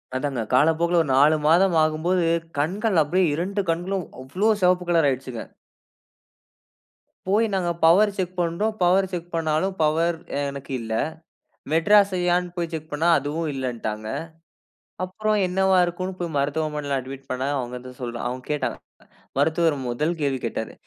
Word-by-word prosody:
அதாங்க 130 -3 -2
காலப்போக்குல 165 +5 +3
ஒரு 145 - -3
4 150 +3 +5
மாதம் 175 +2 +4
ஆகும்போது, 165 +3 +1 0.3
கண்கள் 190 +3 +1
அப்படியே 180 +5 +2
2 195 +6 -1
கண்களும் 180 +2 -2 0.2
அவ்ளோ! 195 +11 +1
சிவப்பு 180 0 +3
கலர் 165 -4 +4
ஆயிடுச்சுங்க. 130 -3 -4 1.8
போய் 210 +4 +3
நாங்க 175 -2 0
பவர் 200 +5 +5
செக் 185 -1 -3
பண்றோம். 190 +6 -1
பவர் 190 +2 +4
செக் 175 -1 -5
பண்ணாலும் 165 +4 0
பவர் 165 +2 +1 0.2
எனக்கு 140 -1 -5
இல்லை. 110 -1 -2 0.7
மெட்ராஸ் 200 +4 +5
ஐ - - -1
யான்னு 180 0 +1
போய் 170 -1 -2
செக் 155 0 -6
பண்ணா 160 +4 +1
அதுவும் 150 +3 -3
இல்லன்ட்டாங்க. 115 -5 -4 1.0
அப்புறம் 215 +3 -1
என்னவா 190 +1 +2
இருக்குன்னு 185 +2 -4
போய் 165 -4 -3
மருத்துவமனையில 145 -1 -1
அட்மிட் 135 +1 -9
பண்ணா 130 +2 -2
அவுங்க 125 -1 -4
வந்து 125 0 -11
சொல்றாங் 120 0 -4
அவுங்க 125 0 -6
கேட்டாங்க. 150 - -1 0.6
மருத்துவர் 160 +1 +2
முதல் 150 +8 -1
கேள்வி 135 -3 0
கேட்டாரு. 110 -1 -4
165 Hz, 140 wpm, -24 LUFS, 140-180 Hz, 1.8 s, 4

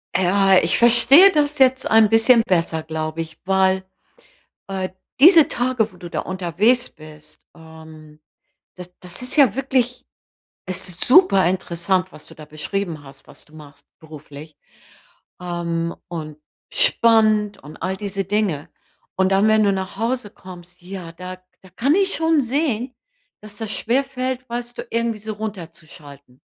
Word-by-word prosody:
Ja. 190 +1 +3
Ich 165 - +1
verstehe 270 +10 +7
das 300 -2 0
jetzt 260 0 +3
ein 220 -1 +5
bisschen 225 +2 +4
besser, 165 -3 -1
glaube 160 0 -4
ich, 160 -1 -10
weil, 190 0 +1 0.8
äh, 190 -1 -4 0.3
diese 330 +1 +7
Tage, 245 -3 -1
wo 180 - -18
du 175 -1 -10
da - - -4
unterwegs 190 +7 0
bist, 155 -1 -16
ähm, 160 -2 -15 0.6
das 180 -1 -11
das 180 +3 -7
ist 250 - -3
ja 280 -6 +4
wirklich 255 -2 -1 0.6
es 185 -1 -4
ist 180 0 -4
super 250 - +5
interessant, 185 0 -1
was 150 - -13
du - - -15
da 155 - -12
beschrieben 155 +1 -5
hast, 135 -1 -17
was - - -16
du 155 - -25
machst 150 -2 -15
beruflich, 155 -1 -13 0.9
ähm, 170 -1 -3
und 155 -3 -7 0.4
spannend 215 - +2
und 150 +2 -12
all 190 +2 -4
diese 200 -1 -4
Dinge. 195 -7 -2 0.5
Und 190 0 +1
dann, 195 +2 +3
wenn 215 0 +3
du 200 - +3
nach 190 0 -5
Hause 230 0 -2
kommst, 180 -2 -14
ja, 180 -2 -9
da 180 +2 -9 0.2
da 190 - -17
kann 250 - 0
ich 390 0 +1
schon 320 -2 +1
sehen, 255 -2 -2 0.5
dass 210 -1 -12
das 220 -1 -5
schwerfällt, 255 +1 -2
weißt 240 0 -6
du, - - -7
irgendwie 230 -1 -2
so 215 +1 -6
runterzuschalten. 160 -10 -10
190 Hz, 150 wpm, -20 LUFS, 165-235 Hz, 0.9 s, verstehe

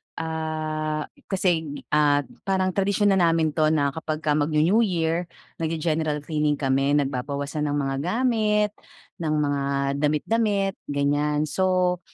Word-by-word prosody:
ah, 155 -1 -3 0.2
kasi, 170 -6 -1
ah, 145 -1 +3 0.2
parang 190 -1 +1
tradisyon 200 +2 +2
na 190 - +3
namin 165 -2 +3
'to 155 0 +2
na 140 -2 +1
kapag 155 +1 -4
magnew-New 155 +6 +2
Year, 170 -1 -1 0.3
nagge-general 155 -2 -1
cleaning 150 -1 0
kami, 135 +1 +1
nagbabawasan 140 +2 -2
ng 145 - -1
mga 135 -2 -1
gamit, 210 - +1 0.5
ng 155 -2 -1
mga 145 -1 0 0.4
damit-damit, 195 +6 +1
ganyan. 145 +1 +1
So, 180 +2 +1
155 Hz, 120 wpm, -24 LUFS, 145-180 Hz, 0.5 s, ah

